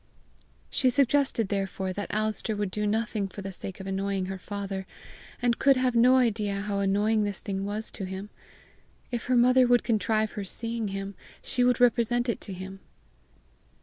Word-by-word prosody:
She 260 Hz, -, +3 dB
suggested 270 Hz, -4 st, +2 dB
therefore 195 Hz, -1 st, -2 dB
that 205 Hz, +1 st, -5 dB
Alister 215 Hz, 0 st, -1 dB
would 205 Hz, -2 st, -2 dB
do 210 Hz, +2 st, -1 dB
nothing 215 Hz, -1 st, 0 dB
for 195 Hz, +1 st, -9 dB
the 195 Hz, -, -5 dB
sake 190 Hz, +1 st, -6 dB
of 190 Hz, -, -7 dB
annoying 195 Hz, 0 st, -1 dB
her 190 Hz, 0 st, -5 dB
father, 195 Hz, -1 st, -5 dB, 0.5 s
and 240 Hz, -2 st, +1 dB
could 275 Hz, -1 st, +5 dB
have 255 Hz, -1 st, +2 dB
no 245 Hz, +2 st, +6 dB
idea 210 Hz, -5 st, +1 dB
how 200 Hz, -1 st, -2 dB
annoying 205 Hz, +2 st, +2 dB
this 205 Hz, -1 st, -2 dB
thing 195 Hz, -1 st, -3 dB
was 210 Hz, +2 st, -3 dB
to 195 Hz, -, -5 dB
him: 190 Hz, +2 st, -6 dB, 0.8 s
if 240 Hz, -2 st, -3 dB
her 250 Hz, 0 st, +2 dB
mother 250 Hz, +1 st, +5 dB
would 245 Hz, 0 st, +4 dB
contrive 220 Hz, -1 st, +1 dB
her 205 Hz, -, -5 dB
seeing 230 Hz, +3 st, -3 dB
him, 195 Hz, 0 st, -4 dB, 0.3 s
she 245 Hz, -, 0 dB
would 250 Hz, -1 st, +3 dB
represent 240 Hz, 0 st, +3 dB
it 235 Hz, -, -1 dB
to 205 Hz, -, -7 dB
him! 190 Hz, +1 st, -8 dB
210 Hz, 180 wpm, -27 LUFS, 195-235 Hz, 0.8 s, no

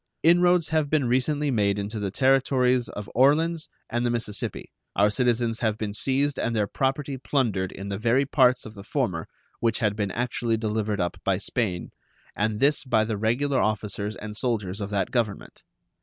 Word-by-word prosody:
Inroads 175 Hz, -1 st, +4 dB
have 155 Hz, -2 st, +1 dB
been 150 Hz, -3 st, +2 dB
recently 140 Hz, +4 st, +1 dB
made 100 Hz, -4 st, +1 dB
into 105 Hz, +2 st, -4 dB
the 100 Hz, -1 st, -2 dB
Territories 130 Hz, +1 st, +2 dB
of 105 Hz, -1 st, -7 dB
Orleans 155 Hz, +6 st, +3 dB, 0.2 s
and 120 Hz, +1 st, -1 dB
the 120 Hz, -, +1 dB
Mississippi, 115 Hz, -3 st, -3 dB, 0.2 s
our 105 Hz, +1 st, +4 dB
citizens 120 Hz, -1 st, +1 dB
have 110 Hz, -2 st, 0 dB
been 105 Hz, -2 st, -3 dB
seized 135 Hz, +5 st, +1 dB
and 115 Hz, -, -1 dB
their 105 Hz, -2 st, +2 dB
property 135 Hz, +4 st, -2 dB
plundered 110 Hz, -10 st, 0 dB
in 100 Hz, +1 st, -7 dB
the 100 Hz, 0 st, -3 dB
very 120 Hz, +5 st, +2 dB
parts 130 Hz, -2 st, +3 dB
of 110 Hz, -, -9 dB
the 100 Hz, -2 st, -10 dB
former 105 Hz, -, -2 dB, 0.3 s
which 115 Hz, -2 st, +1 dB
had 105 Hz, -3 st, 0 dB
been 105 Hz, -2 st, -1 dB
actually 120 Hz, +1 st, -1 dB
delivered 110 Hz, -2 st, -1 dB
up 85 Hz, -1 st, -1 dB
by 95 Hz, -1 st, +1 dB
Spain, 100 Hz, -3 st, -2 dB, 0.4 s
and 105 Hz, 0 st, -1 dB
this 145 Hz, +3 st, +3 dB
by 110 Hz, -5 st, +2 dB
the 110 Hz, -1 st, -2 dB
regular 125 Hz, +6 st, +1 dB
officers 105 Hz, 0 st, -2 dB
and 105 Hz, 0 st, -7 dB
soldiers 105 Hz, -5 st, -2 dB
of 100 Hz, -, -3 dB
that 100 Hz, -1 st, -1 dB
Government. 115 Hz, -5 st, -2 dB
115 Hz, 180 wpm, -25 LUFS, 105-135 Hz, 0.4 s, Inroads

